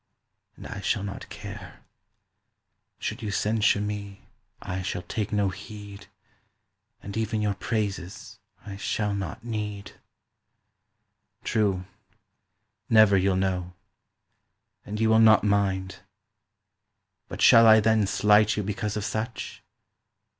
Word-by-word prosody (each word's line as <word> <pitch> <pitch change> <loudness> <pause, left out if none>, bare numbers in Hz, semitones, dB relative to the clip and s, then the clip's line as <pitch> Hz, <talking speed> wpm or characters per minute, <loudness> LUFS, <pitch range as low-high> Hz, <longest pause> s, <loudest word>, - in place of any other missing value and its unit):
And - - -12
I 100 - -7
shall 100 +1 -1
not 100 0 -7
care. 100 -4 -10 1.2
Should - - -5
you 110 - -4
censure 105 0 +1
me 105 -1 -6 0.3
I 95 +1 -4
shall 90 -1 -4
take 105 -1 -4
no 100 -2 +1
heed 100 +1 -10 1.0
And 100 - -7
even 110 0 -1
your 105 -1 +1
praises 100 -4 -4 0.3
I 100 -2 -7
shall 105 +1 -1
not 100 +1 -5
need." 105 -4 -5 1.5
True: 100 -5 0 1.0
never 110 -3 +6
you'll 95 0 +2
know. 90 -1 -1 1.1
And 105 +1 -5
you 110 - +2
will 110 0 +5
not 110 -1 +6
mind. 100 -2 0 1.3
But - - -4
shall 115 0 +8
I 110 0 +8
then 110 -1 +2
slight 105 +2 +3
you 105 - -1
because 105 +1 -3
of 105 - -3
such? 110 +4 -5
105 Hz, 120 wpm, -26 LUFS, 100-110 Hz, 1.5 s, shall